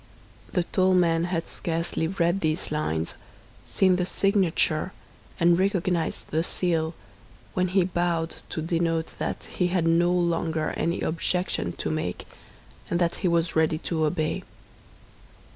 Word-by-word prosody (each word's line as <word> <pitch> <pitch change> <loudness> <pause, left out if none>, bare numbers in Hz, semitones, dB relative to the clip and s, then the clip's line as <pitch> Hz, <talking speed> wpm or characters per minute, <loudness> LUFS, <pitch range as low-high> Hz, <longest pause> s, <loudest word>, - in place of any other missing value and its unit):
The 180 - +2
tall 185 +2 +2
man 170 -2 +3
had 170 -2 -1
scarcely 165 -1 -2
read 175 0 +1
these 155 +1 -1
lines, 80 - -1 0.5
seen 185 -2 +3
the 180 - 0
signature, 185 -4 +1 0.5
and 170 0 +5
recognized 185 -3 0
the 160 - +2
seal, 165 -2 0 0.6
when 185 0 +1
he 185 +1 +3
bowed 175 -2 0 0.2
to 160 - -3
denote 165 -1 0
that - - -3
he 180 - -1
had 175 -2 +1
no 170 +1 +4
longer 165 -3 0
any 170 +2 -1
objection 180 +3 -1
to - - -3
make, - - -3 0.6
and 170 - +1
that 170 -1 +1
he - - 0
was 170 -1 +1
ready 160 0 +3
to 160 0 -2
obey. 155 0 -1
170 Hz, 140 wpm, -26 LUFS, 165-180 Hz, 0.6 s, and